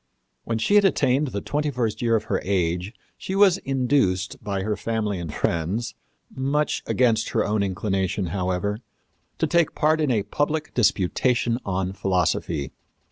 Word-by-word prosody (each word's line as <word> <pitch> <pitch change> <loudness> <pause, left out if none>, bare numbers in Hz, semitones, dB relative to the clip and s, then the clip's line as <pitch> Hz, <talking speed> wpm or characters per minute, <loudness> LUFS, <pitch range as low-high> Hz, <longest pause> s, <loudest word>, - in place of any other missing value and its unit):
When 115 - -1
she 115 - 0
had 205 0 +7
attained 145 -6 +2
the 100 -6 -4
twenty 150 +1 -1
first 120 -5 -2
year 115 -1 +2
of 110 - 0
her 95 - -1
age 90 0 0 0.3
she 190 - -4
was 195 -2 +5
induced 125 -8 0
by 100 -2 -2
her 105 +1 -1
family 105 -4 -2
and 85 -3 -5
friends 85 +10 -1 0.4
much 140 +3 0
against 115 -3 +2
her - - +2
own 105 0 0
inclination, 95 0 -1
however 95 +2 -1 0.6
to - - +1
take 170 -2 +2
part 155 +1 +2
in 150 - +1
a 110 -5 +1
public 150 +8 -2
disputation 120 +2 +1
on 95 -1 -1
philosophy. 90 -6 -1
110 Hz, 155 wpm, -24 LUFS, 95-135 Hz, 0.6 s, had